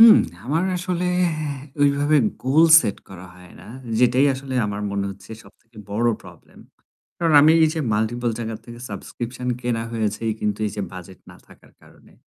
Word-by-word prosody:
হুম। 225 -1 +10 0.3
আমার 160 +7 0
আসলে 180 0 -2 0.8
ওইভাবে 145 +1 +3 0.3
গোল 145 +5 +4 0.2
সেট 100 - -3
করা 95 -1 -11
হয় 90 -1 -16
না। - - -14 0.3
যেটাই 125 +3 +4
আসলে 135 0 -7
আমার 105 0 -4
মনে 100 0 -2
হচ্ছে 100 +1 -13
সবথেকে 110 +3 -23
বড় 115 +4 +1
প্রবলেম। 90 -3 -16 0.6
কারণ 165 -2 +1
আমি 155 +2 +6
এই 160 - +5
যে 160 - -2
মাল্টিপল 115 +3 -1
জায়গার 115 -1 -5
থেকে 120 0 -10
সাবস্ক্রিপশন 120 +5 -6
কেনা 120 -2 -2
হয়েছে 110 -2 -2 0.2
কিন্তু 105 -1 -1
এই - - -3
যে 105 - -2
বাজেট 95 0 -11
না - - -14
থাকার - - -20
কারণে। - - -20
120 Hz, 165 wpm, -22 LUFS, 100-140 Hz, 0.8 s, হুম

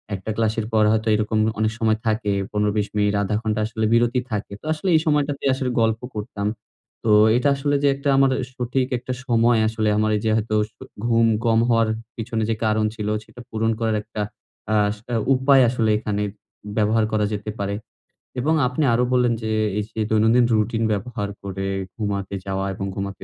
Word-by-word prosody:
একটা 95 +3 -5
ক্লাসের 110 -1 0
পর 110 -1 +4
হয়তো 110 0 0
এরকম 110 +1 0 0.2
অনেক 110 0 +1
সময় 110 -2 +2
থাকে। 110 -2 0 0.2
১৫ 105 0 +1
২০ 105 -1 +1
মিনিট, 105 0 +2
১/২ 100 +1 -1
ঘন্টা 110 -1 -1
আসলে 110 0 -2
বিরতি 120 +1 +3
থাকে। 105 -1 -3
তো - - -15
আসলে 160 +5 -5
এই - - +6
সময়টাতেই 145 -2 +1
আসলে 130 -1 -2
গল্প 110 0 +1 0.2
করতাম। 105 -1 -3 0.6
তো 110 - +2 0.3
এটা 125 +3 +2
আসলে 145 +1 0
যে, - - +5
একটা 140 +1 -2
আমার 135 -1 +4 0.2
সঠিক 125 +1 -1
একটা 125 +1 -5
সময় 120 -2 +3
আসলে 110 -1 0
আমার 110 0 +2
যে - - +2
হয়তো 110 0 -2
আস 105 - -7 0.4
ঘুম 115 -1 +3 0.2
কম 115 -1 +4
হওয়ার 115 -1 +3 0.3
পিছনে 115 -1 -2
যে 115 - +1
কারণ 110 0 +2
ছিল 105 -2 -4 0.2
সেটা 120 - -13
পূরণ 110 0 0
করার 110 -1 0
একটা 105 0 -6 0.5
আ - - +3 0.2
সেটা 115 +3 -6 0.2
উপায় 135 +1 +5
আসলে 115 -2 0
এখানে 105 -1 -2 0.6
ব্যবহার 110 +1 +3
করা 105 -1 +1
যেতে 105 +1 -5
পারে। 100 0 -2 0.6
এবং 150 +6 +1
আপনি 130 +4 -1
আরো 120 +2 +2
বললেন 125 -1 +3
যে, 110 - -2 0.3
এই - - -1
যে - - -4
দৈনন্দিন 110 +3 +4
রুটিন 110 +1 0
ব্যবহার 105 0 -3
করে 95 0 -4 0.3
ঘুমাতে 100 -2 -3
যাওয়া 95 0 -2
এবং 95 +1 -4
ঘুমাতে 100 0 -5
110 Hz, 185 wpm, -22 LUFS, 105-120 Hz, 0.6 s, এই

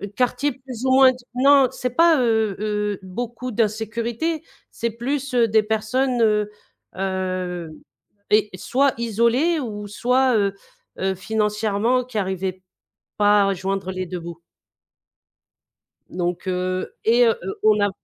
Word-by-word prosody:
quartiers 255 +2 0
plus 260 -1 -8
ou 260 - +2
moins 265 -1 +7
d 250 - -9 0.2
non 275 0 +5
c'est 250 - -3
pas, 330 +1 +4
heu 220 -4 +1
heu, 210 -1 -2
beaucoup 240 +6 -5
d'insécurité, 230 +8 -1 0.3
c'est 235 -1 -3
plus 265 +3 -3
des 225 -3 +3
personnes, 230 +4 0
heu 210 -1 +2 0.5
heu 185 -3 -3 0.6
et 210 0 +3
soit 270 +6 +1
isolées 235 +9 +1
ou 210 -5 -5
soit, 250 +4 +2
heu 200 -1 +1 0.5
heu, 190 0 0
financièrement 215 +4 0
qui 250 -4 -7
arrivaient 190 -1 -2 0.6
pas 205 -1 +4
à - - +1
joindre 190 0 -3
les 185 0 -4
2 180 0 -5
bouts 170 0 -9 1.7
Donc 175 0 -3
heu 185 0 -2
et 240 +2 +5
heu 225 - +2
heu, 190 - -4
on 215 -1 +4
a 205 - +3
220 Hz, 135 wpm, -22 LUFS, 195-250 Hz, 1.7 s, moins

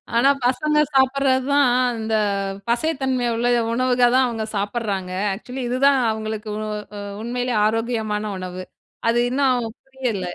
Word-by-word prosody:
ஆனா, 240 +4 +5
பசங்க 300 +5 +1 0.2
சாப்புடுறதான், 270 0 +3 0.3
இந்த 220 0 -3 0.6
பசைத்தன்மை 260 -1 0
உள்ள 235 +1 0 0.3
உணவுகதான் 250 +1 +3
அவங்க 225 -2 -3
சாப்புடுறாங்க. 200 -2 -2 0.2
ஆக்சுவலி 250 +6 -7
இதுதான், 270 +2 +3
அவங்களுக்கு 220 0 -4
உ - - -4 0.4
அ - - -5 0.2
உண்மையிலேயே 245 0 -2
ஆரோக்கியமான 220 -1 -1
உணவு. 185 0 -6 0.5
அது 230 - +2
இன்னும் 255 -3 +1 0.2
புரியல 255 -7 -3
245 Hz, 115 wpm, -22 LUFS, 220-265 Hz, 0.6 s, ஆனா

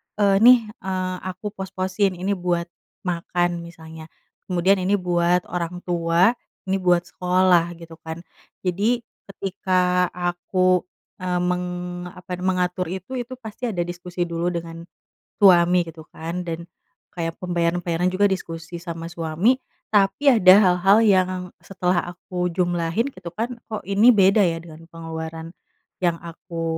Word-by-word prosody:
eee, 200 -1 +3
"Nih, 245 +2 +8 0.2
eee, 185 -1 -2
aku 185 +3 -5
pos-posin 190 0 -1
ini 185 +3 -2
buat 175 -2 0 0.4
makan," 175 0 -1
misalnya. 160 -1 -11 0.4
Kemudian, 185 +2 +2
"Ini 190 +3 +2
buat 175 -1 +1
orang 180 0 -4
tua, 170 +3 +3 0.3
ini 190 0 -1
buat 175 -1 +3
sekolah," 180 -1 +2
gitu 165 -1 -13
kan. 160 +1 -6 0.4
Jadi 210 +7 +1 0.3
ketika 180 -2 0
aku, 180 +1 +1 0.4
eee, 180 -1 0
meng 180 0 0 0.4
apa, 180 0 -9
mengatur 180 0 0
itu, 190 +7 -6
itu 245 +1 -5
pasti 225 0 -7
ada 180 -5 -2
diskusi 175 0 -4
dulu 170 +1 -1
dengan 165 0 -6 0.6
suami 180 -2 +6
gitu 160 -1 -12
kan. 170 +3 -5
Dan 170 0 -5 0.5
kayak 165 -2 -4
pembayaran-pembayaran 175 0 0
juga 195 +2 +2
diskusi 170 -3 -3
sama 165 -1 -6
suami, 170 +7 +1 0.4
tapi 210 +8 +4
ada 185 -4 +8
hal-hal 195 +1 +5
yang 185 -3 +4 0.3
setelah 180 -2 0
aku 180 0 -4
jumlahin 175 +3 0
gitu 170 - -8
kan, 230 +7 -3 0.2
"Kok 215 -5 -5
ini 200 +5 +5
beda 200 -1 +5
ya 170 -3 +2
dengan 165 0 -12
pengeluaran 165 0 -7 0.5
yang 170 -2 +1
aku, 165 0 -7
180 Hz, 135 wpm, -23 LUFS, 170-190 Hz, 0.6 s, Nih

